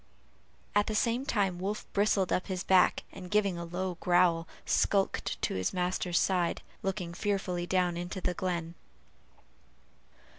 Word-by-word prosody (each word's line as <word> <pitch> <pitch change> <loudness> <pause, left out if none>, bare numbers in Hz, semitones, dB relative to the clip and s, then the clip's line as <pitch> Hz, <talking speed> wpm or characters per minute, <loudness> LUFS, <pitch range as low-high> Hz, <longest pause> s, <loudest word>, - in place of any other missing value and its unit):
at 205 0 +3
the 215 - -1
same 235 +4 +1
time 195 -5 +1
Wolf 200 +3 -3
bristled 200 -2 +2
up 185 - 0
his 185 -2 -3
back, 185 -1 +4
and 185 -2 -9
giving 200 -2 +2
a - - -4
low 180 +1 -3
growl, 175 -2 +3 0.2
skulked 195 -1 +1
to - - +1
his 95 -1 -1
master's 180 -1 0
side, 180 -3 +1 0.2
looking 190 -3 -3
fearfully 185 -3 -1
down 180 -2 +1
into 175 +2 -4
the 180 -1 -1
glen. 175 -3 -2
185 Hz, 145 wpm, -30 LUFS, 175-195 Hz, 0.2 s, back